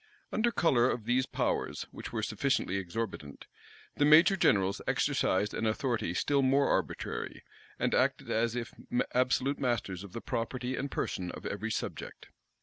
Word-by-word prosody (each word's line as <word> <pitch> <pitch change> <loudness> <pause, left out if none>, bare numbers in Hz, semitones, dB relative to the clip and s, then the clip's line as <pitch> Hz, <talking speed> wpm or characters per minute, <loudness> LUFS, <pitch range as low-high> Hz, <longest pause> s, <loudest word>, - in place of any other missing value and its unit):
Under 230 +2 +2
color 130 - +3
of 115 -4 -3
these 130 +2 +2
powers, - - -1
which - - -8
were - - -2
sufficiently 95 - 0
exorbitant, 90 -6 -5 0.5
the - - +3
major 155 +6 +7
generals 100 - +2
exercised 105 +3 +1
an 110 - -1
authority 110 -5 -1
still 140 +8 +2
more 135 +1 +3
arbitrary, - - -2 0.3
and - - 0
acted - - +1
as 115 +1 +1
if 120 -1 -4 0.4
absolute 130 +2 +1
masters 110 -8 -1
of 100 -2 -11
the 115 - -4
property 125 +1 -3
and 140 - -3
person 90 -7 -3
of - - -8
every 105 +3 -3
subject. 110 - -5
120 Hz, 150 wpm, -31 LUFS, 100-135 Hz, 0.5 s, major